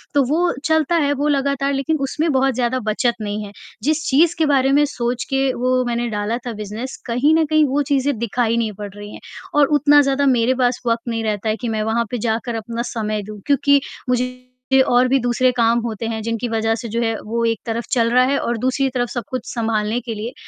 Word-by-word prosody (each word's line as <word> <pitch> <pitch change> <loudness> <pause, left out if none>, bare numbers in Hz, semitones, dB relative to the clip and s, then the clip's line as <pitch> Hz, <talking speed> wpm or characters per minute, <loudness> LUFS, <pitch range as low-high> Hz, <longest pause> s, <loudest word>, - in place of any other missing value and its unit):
तो 285 - +5
वो 345 +3 +2
चलता 315 +1 +2
है 290 -3 +2
वो 290 +2 -1
लगातार 280 0 0
लेकिन 310 +4 0
उसमें 300 +4 0
बहुत 265 0 +2
ज़्यादा 255 +1 0
बचत 230 +2 0
नहीं 210 0 -3
है, 200 - -10 0.3
जिस 310 +2 +1
चीज़ 325 +5 +4
के 315 - +4
बारे 270 -1 +3
में 295 +1 +5
सोच 245 -3 -2
के 270 -1 +1
वो 255 +1 +1
मैंने 240 0 -1
डाला 210 +2 -2
था 235 - -3
बिज़नेस, 215 +5 -6
कहीं 250 +7 +2
न 320 -1 +3
कहीं 310 0 +3
वो 280 +2 +1
चीज़ें 275 -2 +1
दिखाई 235 0 0
नहीं 225 -2 0
पड़ 205 -1 -5
रही 205 0 -9
हैं - - -9 0.4
और 285 - +5
उतना 290 +1 +6
ज़्यादा 275 0 +1
मेरे 250 -1 +3
पास 245 0 +1
वक़्त 230 +1 0
नहीं 225 -1 -2
रहता 215 0 -1
है 215 - +1
कि 240 - -2
मैं 215 -1 -1
वहाँ 230 +2 0
पे 245 - -1
जाकर 230 +1 -2
अपना 230 +1 -4
समय 215 -2 -2
दूँ 210 -1 -8
क्योंकि 285 0 +4 0.3
मुझे 250 +1 0
और 245 +1 +4
भी 270 0 +3
दूसरे 245 +1 +2
काम 235 -1 +2
होते 225 -1 -4
हैं 220 -1 -3
जिनकी 230 +1 -2
वज़ह 225 0 0
से 235 - -6
जो 230 +2 -1
है 225 -1 0
वो 230 +2 -2
एक 225 -2 0
तरफ 230 0 -3
चल 230 -2 +2
रहा 250 +1 +5
है 280 +2 +1
और 235 -1 -2
दूसरी 260 +3 0
तरफ 245 -2 -2
सब 240 -3 -4
कुछ 255 -2 -4
सँभालने 225 0 -1
के 230 -1 -5
लिए 225 +4 -5
245 Hz, 230 wpm, -20 LUFS, 225-275 Hz, 0.4 s, उतना